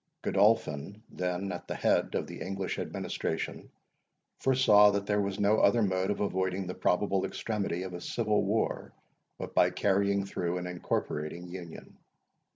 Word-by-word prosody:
Godolphin, 100 -2 +1
then 90 +1 -2
at 90 - -7
the - - -3
head - - +1
of - - 0
the - - -9
English 95 0 -3
administration, - - -4 0.7
foresaw 110 -6 +6
that 100 0 -1
there 105 0 +1
was 100 0 -3
no 105 +2 +3
other 115 +3 +4
mode 95 -1 0
of 105 - -1
avoiding 95 -1 -1
the 90 - -4
probable 95 +1 +1
extremity 100 -5 -2
of 95 -1 -6
a 90 - -6
civil 105 0 0
war, 105 +3 -1 0.4
but - - -7
by 90 - +5
carrying 100 +1 +1
through 90 -2 -2
an 90 - -4
incorporating 85 -1 -3
union. 85 -2 -10
95 Hz, 155 wpm, -30 LUFS, 90-105 Hz, 0.7 s, foresaw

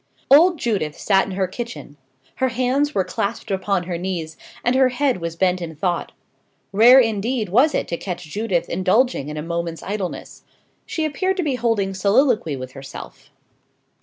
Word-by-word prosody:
Old 335 +5 +7
Judith 195 - -2
sat 195 -2 +2
in 195 - -5
her 190 0 0
kitchen. 230 -5 -7 0.4
Her 260 - +2
hands 260 +4 0
were 190 - +2
clasped 200 +3 -3
upon 190 -1 0
her 175 -1 -4
knees, 170 -4 -4 0.3
and 245 - +3
her 260 0 +4
head 255 -5 0
was 165 -1 -4
bent 180 +1 +1
in 160 -2 -6
thought. 175 +2 -2 0.6
Rare 235 +6 +7
indeed 225 -1 0
was 255 - +4
it - - -1
to 170 - -2
catch 180 -1 -5
Judith 175 +1 -2
indulging 185 - +1
in 150 - -6
a 150 - -4
moment's 170 0 -4
idleness. 200 -2 -5 0.5
She 320 - -2
appeared 375 +6 -1
to 365 - 0
be 290 -4 0
holding 225 -5 0
soliloquy 200 - +2
with 130 -1 -7
herself. 135 0 -11
200 Hz, 170 wpm, -21 LUFS, 175-250 Hz, 0.6 s, Old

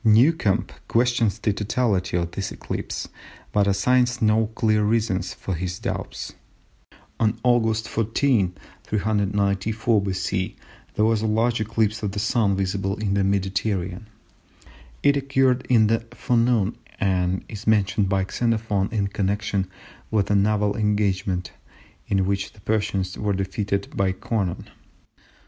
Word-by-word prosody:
Newcomb 110 - +4 0.2
questions 115 -3 +2
the 105 -2 0
totality 100 -3 0
of 85 -1 -2
this 95 +2 -4
eclipse, - - -5 0.4
but 100 -1 +2
assigns 120 +5 +2
no 110 0 +3
clear 110 -1 +1
reasons 105 -3 0
for 95 - -4
his 90 +1 -3
doubts. - - -5 0.9
On 110 -1 +2
August 115 -3 +2
14, 115 -4 +1 0.3
394 105 +1 +1
B.C., 95 -1 -2 0.4
there 105 - +3
was 110 -1 +2
a 110 - 0
large 115 +1 +1
eclipse 110 -1 0
of 100 -2 -2
the 105 - -2
Sun 110 -2 +2
visible 95 0 -1
in 105 -2 -1
the 100 -1 +2
Mediterranean. 95 0 -1 1.0
It 140 0 +4
occurred 135 -2 +1
in 115 -3 +5
the 115 +1 +2 0.2
forenoon, 120 -5 +1 0.2
and 95 -2 0
is 110 0 -9
mentioned 105 -2 +2
by 95 -1 +1
Xenophon 110 -3 0
in 105 -3 0
connection 100 -1 -1 0.4
with 105 -2 +1
a - - +4
naval 105 0 +2
engagement 100 -3 0 0.6
in 95 -1 +1
which 100 0 -2
the 105 - -18
Persians 100 -3 -1
were 105 -1 0
defeated 100 +1 -2
by 95 -1 +1
Conon. 95 -2 -2
105 Hz, 130 wpm, -24 LUFS, 95-110 Hz, 1.0 s, in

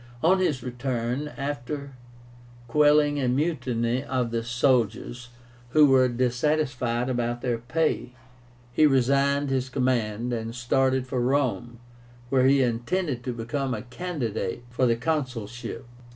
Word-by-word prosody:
On 185 +4 +4
his 145 -9 0
return, 125 +2 -2
after 140 0 -4 0.8
quelling 145 +2 +4
a 130 - +1
mutiny 125 -3 0
of 125 -4 -1
the 115 0 -1
soldiers, 120 -1 0 0.4
who 155 -1 +7
were 130 -2 +5
dissatisfied 125 0 0
about 120 -1 -1
their 120 -2 0
pay, 130 +1 -1 0.6
he 155 +4 +5
resigned 140 +1 +2
his 130 -1 0
command, 120 -3 0
and 115 0 -4
started 130 +2 +1
for 130 -1 -2
Rome, 125 -2 0 0.5
where 130 -1 +4
he 135 0 +5
intended 125 +3 -1
to 125 - -1
become 125 +3 -3
a - - -6
candidate 125 - -4
for 125 +1 +2
the 115 - +3
consulship. 125 -4 -3
130 Hz, 125 wpm, -26 LUFS, 120-140 Hz, 0.8 s, who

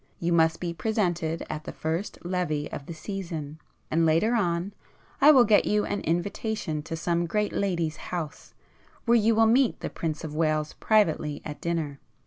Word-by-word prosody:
You 170 0 0
must 160 -1 +3
be 175 -1 -3
presented 175 -5 -1
at 155 0 -5
the - - -5
first 165 +6 -3
Levée 175 -5 -1
of 140 - -6
the 170 - -5
season, 160 -5 -6 0.3
and 165 +1 +3
later 165 +9 +3
on, 180 -3 0 0.5
I 285 - +8
will 265 -5 +8
get 210 -2 +4
you 210 0 +2
an 205 - -2
invitation 175 -1 -2
to 165 - -5
some 170 +1 0
great 210 +4 0
lady's 170 -6 -1
house, 165 -4 -6 0.5
where 235 - +4
you 225 0 +4
will 225 0 +5
meet 240 +3 +3
the - - -4
Prince 160 -1 -3
of 155 -2 -5
Wales 155 -1 0
privately 160 -9 +1
at 150 -1 -7
dinner. 160 -5 -2
170 Hz, 175 wpm, -27 LUFS, 160-205 Hz, 0.5 s, I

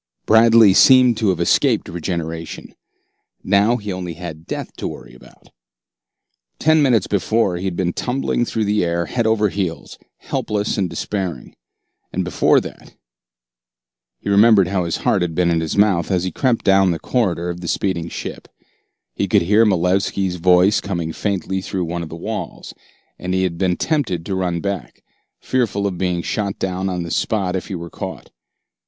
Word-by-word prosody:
Bradley 110 -2 +6
seemed 125 0 +6
to 110 -3 +1
have 90 -3 0
escaped 85 - +2
regeneration. 85 -1 -5 0.7
Now 100 +5 +3
he 105 -3 -6
had - - -3
only 90 -3 -6 0.3
death - - -5
to - - -3
worry - - -9
about. 65 - -18 1.1
Ten 155 0 +3
minutes 120 -8 +3
before, 100 0 0
he 90 - -5
had 95 -2 -2
been 90 -1 -1
tumbling 125 -1 -1
through 110 -2 -2
the 105 -1 +1
air 85 0 -1
head 120 +3 -1
over 105 -2 +2
heels, 90 -4 -4 0.2
helpless 105 0 -2
and 95 -4 -1
despairing. 90 +1 -4 0.6
And - - -1
before - - +3
that - - -11 1.2
He - - -11
remembered 100 -2 +5
how 95 -2 0
his 85 - -2
heart - - +1
had 85 -2 -2
been 85 0 +2
in 85 - +1
his 80 +4 -3
mouth 100 -5 +3
as 90 -3 +1
he 95 - -1
had - - -15
crept 125 -4 0
down 95 -1 +4
the 85 - 0
corridor 90 -6 -1
of 85 0 -8
the 85 - -6
speeding 85 -2 -1
ship. - - -7 0.7
He - - -1
could - - +3
hear 105 +5 +4
Malevski's 95 0 0
voice 90 +4 +4
coming 85 -5 -3
faintly 95 -1 -2
through 95 -1 -3
one 85 +1 -4
of 80 - -6
the 80 - -7
walls, 85 - -6 0.5
and 90 +1 -2
had 90 -3 -1
been 90 -2 +1
tempted 115 - -1
to 100 - -3
run 90 -2 -1
back, 100 -9 -5 0.4
fearful 110 -6 -1
of 95 -3 -3
being 90 -2 -1
shot 100 -2 -2
down 95 0 -2
on 90 -2 -3
the 85 - -6
spot 95 -4 -1
if 95 - -4
he 95 - -5
were 85 -1 -7
caught. - - -7
95 Hz, 175 wpm, -20 LUFS, 85-105 Hz, 1.2 s, Bradley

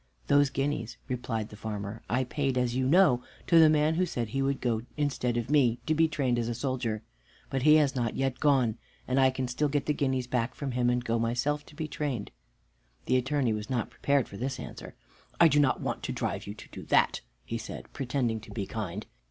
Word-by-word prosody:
"Those 145 -1 +4
guineas," 135 -4 -2
replied 120 -4 -3
the - - -11
farmer, 105 0 -5
"I 125 +3 +2
paid, 135 0 -1
as 125 -1 +1
you 130 0 +1
know, 150 -6 +5 0.2
to 170 - +6
the 160 -1 +8
man 155 +1 +3
who 180 +2 +1
said 120 -8 -3
he 135 +5 -1
would 135 0 0
go 115 -3 0 0.2
instead 130 -5 0
of 120 +3 -2
me 125 -6 +4
to 155 - +2
be 160 +1 +4
trained 135 -6 0
as 115 - -1
a 120 - -2
soldier. 120 -4 -2 0.5
But 135 -1 0
he 150 +3 +7
has 145 -3 +3
not 120 -3 -1
yet 135 -2 -1
gone, 130 -7 +2 0.3
and 130 +1 +2
I 130 0 +6
can 130 -1 -2
still 135 +5 0
get 145 0 0
the 150 - +1
guineas 130 -3 0
back 125 0 -1
from 140 -2 -4
him 120 0 +1
and 125 0 0
go 115 0 +1
myself 125 +6 -1
to - - -15
be 155 0 -3
trained." 140 -9 -3 0.7
The 130 - +3
Attorney 130 -2 +1
was 105 0 -5
not 125 -3 -1
prepared 140 -2 +1
for 100 - -10
this 130 +4 -3
answer. - - -8 0.4
"I 170 - +8
do 150 -1 +3
not 140 -3 +2
want - - -3
to - - -3
drive - - -3
you 100 - -6
to - - -10
that," - - +3 0.2
he 115 - -3
said, 110 - -7
pretending 120 -4 -1
to 110 - -14
be 100 -4 -3
kind. 105 -1 -5
130 Hz, 225 wpm, -29 LUFS, 115-145 Hz, 0.7 s, the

